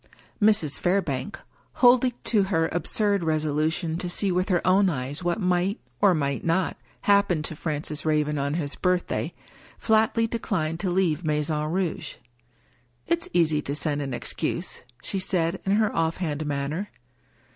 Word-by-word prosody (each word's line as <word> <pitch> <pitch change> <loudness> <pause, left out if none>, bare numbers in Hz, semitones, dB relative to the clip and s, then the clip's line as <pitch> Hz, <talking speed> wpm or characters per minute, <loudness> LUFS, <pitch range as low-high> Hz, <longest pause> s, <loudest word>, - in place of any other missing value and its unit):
Mrs. 205 -9 +3
Fairbank 180 -2 -1 0.2
— - - -36
holding 245 0 +6
to 215 -4 +3
her 165 -4 +1
absurd 200 +3 +1
resolu 155 -1 +1
tion 165 0 -3
to 180 - -2
see 195 +2 +1
with 180 +3 0
her 180 -2 +1
own 190 +2 +4
eyes 140 +2 -4
what 175 +4 0
might, 180 +1 +1 0.2
or 190 -3 +5
might 140 -3 -1
not, 170 +3 +1 0.3
happen 200 -6 +3
to 160 - -3
Francis 150 -1 -4
Raven 150 -1 +1
on 140 +2 -1
his 145 -4 -1
birthday 180 -1 0 0.3
— - - -24
^flatly 220 +1 +2
declined 175 -8 -2
to 190 - -1
leave 175 -3 +1
Maison 150 0 0
Rouge. 180 0 -2 0.5
" 120 0 -38
It's 340 0 -1
easy 160 -3 +3
to 140 0 -3
send 150 -1 -1
an 135 -3 -3
excuse," - - -3 0.2
she 195 - -2
said, 180 -1 0
in 195 - +3
her 215 0 +2
off 165 0 0
hand 155 -4 -3
manner. 145 +7 -2
170 Hz, 165 wpm, -25 LUFS, 150-195 Hz, 0.5 s, holding